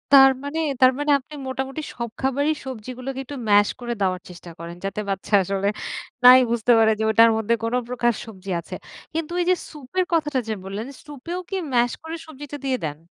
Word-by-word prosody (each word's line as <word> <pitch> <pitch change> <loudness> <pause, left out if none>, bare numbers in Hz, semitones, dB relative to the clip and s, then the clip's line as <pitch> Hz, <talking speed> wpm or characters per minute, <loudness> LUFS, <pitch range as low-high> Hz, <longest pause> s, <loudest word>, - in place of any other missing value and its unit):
তার 270 0 +9
মানে? 295 +3 -3 0.2
তার 255 - +8
মানে 290 0 +1
আপনি 275 +3 -16
মোটামুটি 265 +3 -3
সব 235 -1 -4
খাবারই 285 +4 +1
সবজিগুলোকে 255 +2 -6
একটু 285 +2 -8
mash 205 0 +6
করে 240 -1 -3
দেওয়ার 185 -1 +1
চেষ্টা 175 -1 -11
করেন, 170 +1 -7
যাতে 195 +2 -3
বাচ্চা 195 +2 -4
আসলে 195 +1 -1 0.6
নাই 250 +1 +10
বুঝতে 235 +1 +2
পারে 220 0 +5
যে - - 0
ওটার 230 +1 +7
মধ্যে 225 +1 +1
কোন 230 +1 -1
প্রকার 240 -1 +1
সবজি 195 -4 -11
আছে। 170 - -8 0.4
কিন্তু 325 +1 -3
ওইযে 360 +1 +3 0.2
সুপের 310 +5 -2
কথাটা 300 -5 +1
যে 220 - -1
বললেন, 200 +5 -5 0.2
সুপেও 300 +5 -6
কি 390 - -2 0.2
ম্যাস 240 0 +3
করে 320 +1 -5
সবজিটা 290 -1 -8
দিয়ে 260 -1 +1
দেন? 150 0 -5
250 Hz, 190 wpm, -23 LUFS, 215-290 Hz, 0.6 s, নাই